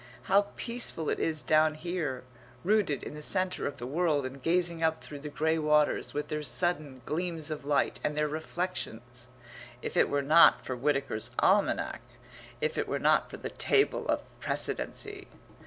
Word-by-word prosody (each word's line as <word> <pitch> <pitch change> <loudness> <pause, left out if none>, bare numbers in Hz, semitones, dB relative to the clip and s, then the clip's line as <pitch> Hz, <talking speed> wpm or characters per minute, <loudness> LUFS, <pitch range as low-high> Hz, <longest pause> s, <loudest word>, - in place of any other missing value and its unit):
How 200 +1 +3
peaceful 235 -9 -1
it - - -2
is 155 -2 0
down 155 0 +3
here, 155 -6 -3 0.4
rooted 200 -7 +1
in - - -6
the 150 - -8
centre 185 +3 +1
of 140 - -6
the 120 - -6
world 150 0 0
and 130 +1 -7
gazing 170 +1 +1
up 160 -1 0
through 145 - -8
the 150 +1 -7
grey 160 +2 0
waters, 150 -1 +2
with 150 - -3
their 150 -1 -2
sudden 150 -5 0
gleams 165 -1 -3
of 150 -2 -5
light, 145 -1 +1
and 150 0 -1
their 150 0 +2
reflections 145 -7 -4 0.6
if - - -5
it - - +4
were 140 0 0
not 160 +4 +6
for 130 - -3
Whitaker's 135 -3 0
Almanack 200 +2 +2 0.6
if 470 +1 -1
it - - -1
were - - -1
not - - +2
for - - -8
the - - -6
Table 415 - +1
of - - 0 0.2
Precedency! 415 -2 -2
155 Hz, 170 wpm, -29 LUFS, 145-175 Hz, 0.6 s, not